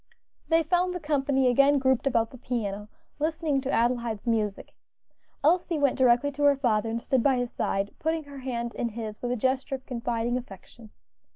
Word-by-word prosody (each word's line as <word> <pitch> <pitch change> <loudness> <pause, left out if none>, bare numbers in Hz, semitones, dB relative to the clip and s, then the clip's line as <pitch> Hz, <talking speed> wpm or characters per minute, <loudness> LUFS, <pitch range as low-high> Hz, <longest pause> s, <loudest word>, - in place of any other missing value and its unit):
They 325 0 +4
found 360 +3 +1
the - - -3
company 280 -3 +1
again 275 +3 +4
grouped 260 -1 +1
about 230 -4 +1
the 255 - -12
piano, 210 -4 -3 0.3
listening 310 -2 0
to 270 +1 -3
Adelaide's 235 -2 0
music. 215 -4 -1 0.7
Elsie 340 +2 +2
went 280 -3 +2
directly 255 +2 +3
to 290 +1 -4
her 285 -1 +6
father 225 -4 +1
and 230 +1 -2
stood 260 +1 +1
by 265 +1 +3
his 245 -1 -2
side, 200 -2 -2
putting 320 0 -1
her 285 -1 -10
hand 235 -2 -4
in 235 - -2
his 220 -1 -7
with 245 - -2
a - - +1
gesture 260 +3 0
of 265 0 -10
confiding 240 -1 -2
affection. 220 0 -13
255 Hz, 185 wpm, -27 LUFS, 230-285 Hz, 0.7 s, her